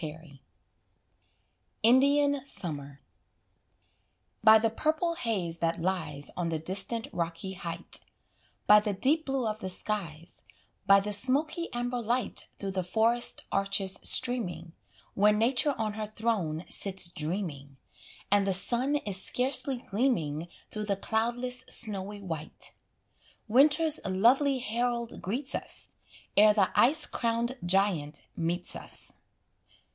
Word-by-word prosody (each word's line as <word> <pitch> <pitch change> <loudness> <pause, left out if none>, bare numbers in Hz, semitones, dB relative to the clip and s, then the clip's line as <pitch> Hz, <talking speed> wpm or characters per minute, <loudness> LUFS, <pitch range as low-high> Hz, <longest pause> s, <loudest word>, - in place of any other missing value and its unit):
Matthew, 155 -1 -6
XII. 140 -4 -17 1.4
INDIAN 280 +3 +3
SUMMER 145 - -4 1.4
By 220 0 +8
the 220 0 0
purple 315 +7 -1
haze 195 - -3
that 165 0 -1
lies 160 -5 -3
On 175 -2 -2
the 165 - -1
distant 195 +8 +1
rocky 170 +2 -4
height, 170 -2 -6 0.7
By 210 0 +7
the 210 -1 -3
deep 295 +11 +1
blue 270 -2 -1
of 215 0 -3
the 190 - -5
skies, 180 -4 -3 0.4
By 195 0 +6
the 210 +1 -3
smoky 300 - -1
amber 245 0 -3
light 235 +1 -2
Through 195 -1 -5
the 190 -1 -2
forest 230 +6 +1
arches 195 -1 0
streaming, 220 -9 +2 0.4
Where 205 +2 +4
Nature 245 +6 +2
on 215 -2 -2
her 215 0 -5
throne 205 -8 -2
sits 195 -2 +4
dreaming, 150 -5 -5 0.5
And 200 -1 +3
the 195 - +2
sun 245 +9 +2
is 200 -9 0
scarcely 260 +2 0
gleaming 175 - -1 0.2
Through 215 0 -4
the 200 -1 0
cloudless 240 +4 -2
snowy 205 -3 +3
white, 160 -4 -5 0.7
Winter's 300 +6 +4
lovely 250 +9 +2
herald 235 0 -2
greets 255 +9 -2
us, - - -1 0.5
Ere 210 0 +6
the 195 -4 +2
ice 300 +6 +4
crowned 235 +1 -1
giant 175 -5 0
meets 175 +2 0
us. - - -2
210 Hz, 125 wpm, -28 LUFS, 180-245 Hz, 1.4 s, By